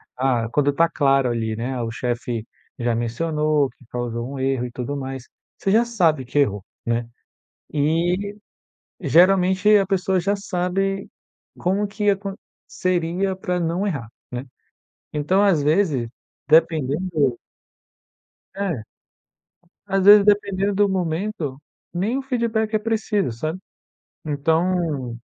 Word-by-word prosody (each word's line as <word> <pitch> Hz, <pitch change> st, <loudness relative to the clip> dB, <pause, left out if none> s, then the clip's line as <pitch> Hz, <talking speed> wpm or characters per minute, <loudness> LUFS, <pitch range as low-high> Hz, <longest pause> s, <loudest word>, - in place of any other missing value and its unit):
Ah 125 Hz, -3 st, +1 dB
quando 145 Hz, +3 st, +2 dB
está 165 Hz, +4 st, +3 dB
claro 135 Hz, -5 st, +2 dB
ali, 110 Hz, -2 st, -2 dB
né, 125 Hz, +3 st, -3 dB
o 115 Hz, -, -2 dB
chefe, 120 Hz, -1 st, -3 dB, 0.3 s
já 120 Hz, -1 st, 0 dB
mencionou 150 Hz, +5 st, +1 dB
que -, -, -22 dB
causou 120 Hz, 0 st, -4 dB
um -, -, -6 dB
erro 130 Hz, -2 st, 0 dB
e 120 Hz, -, -11 dB
tudo 125 Hz, +3 st, -4 dB
mais, 135 Hz, -2 st, -6 dB, 0.3 s
você 195 Hz, -, -1 dB
já 225 Hz, +3 st, +5 dB
sabe 170 Hz, -, +2 dB
que 125 Hz, -, -5 dB
errou, 105 Hz, -8 st, +1 dB, 0.2 s
né. 115 Hz, 0 st, -1 dB, 0.6 s
E, 175 Hz, +7 st, 0 dB, 0.6 s
geralmente, 190 Hz, +3 st, +4 dB
a 195 Hz, -, +2 dB
pessoa 190 Hz, -1 st, +1 dB
já 200 Hz, +3 st, +1 dB
sabe, 195 Hz, +1 st, -2 dB, 0.5 s
como 195 Hz, +3 st, 0 dB
que 205 Hz, 0 st, 0 dB
acon 195 Hz, 0 st, -1 dB, 0.3 s
seria 185 Hz, +2 st, -1 dB
para 180 Hz, -2 st, -2 dB
não 170 Hz, +5 st, 0 dB
errar, 135 Hz, -, -3 dB, 0.2 s
né. 125 Hz, +1 st, -5 dB, 0.7 s
Então 155 Hz, +7 st, +2 dB
às 190 Hz, -7 st, +4 dB
vezes, 150 Hz, -5 st, +2 dB, 0.4 s
dependendo 155 Hz, -3 st, +2 dB, 1.2 s
É. 185 Hz, -, -2 dB, 1.0 s
Às 195 Hz, -1 st, +1 dB
vezes, 205 Hz, 0 st, +9 dB
dependendo 200 Hz, -1 st, +2 dB
do 205 Hz, 0 st, +3 dB
momento, 175 Hz, -4 st, -2 dB, 0.4 s
nem 200 Hz, +9 st, 0 dB
o -, -, -2 dB
feedback 230 Hz, -4 st, -1 dB
é -, -, +4 dB
preciso, 215 Hz, -, 0 dB
sabe. 155 Hz, +9 st, -3 dB, 0.7 s
Então, 155 Hz, -4 st, 0 dB
165 Hz, 130 wpm, -22 LUFS, 135-195 Hz, 1.2 s, vezes